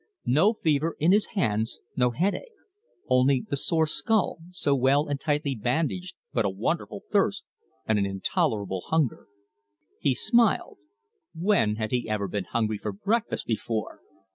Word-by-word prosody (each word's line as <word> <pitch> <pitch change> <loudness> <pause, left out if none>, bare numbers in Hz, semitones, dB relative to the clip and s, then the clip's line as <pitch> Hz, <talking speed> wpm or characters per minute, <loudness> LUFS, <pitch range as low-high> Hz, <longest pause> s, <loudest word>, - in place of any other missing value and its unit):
No 160 - +4
fever 160 -5 0
in 160 +4 +3
his 210 +1 +3
hands, 110 - 0 0.2
no 125 -1 +3
headache, 200 - -2 0.5
only 130 0 +3
the - - -1
sore 160 +3 +1
skull, 205 +3 +1
so 145 -6 +1
well 135 +3 +3
and 145 -1 -2
tightly 145 -1 0
bandaged 160 - -2 0.2
but 115 - +2
a 100 - +1
wonderful 95 +1 -3
thirst, - - +2 0.4
and 110 -1 +2
an 100 - +1
intolerable 95 0 -1
hunger. 160 -6 0 0.7
He 135 -4 +2
smiled. 235 - +2 0.6
When 170 - +2
had 110 0 -3
he 120 -3 -1
ever 105 -2 -1
been 95 0 -3
hungry 110 -1 -1
for 105 - -3
breakfast 220 - -1
before? 110 -1 -3
135 Hz, 145 wpm, -26 LUFS, 110-165 Hz, 0.7 s, No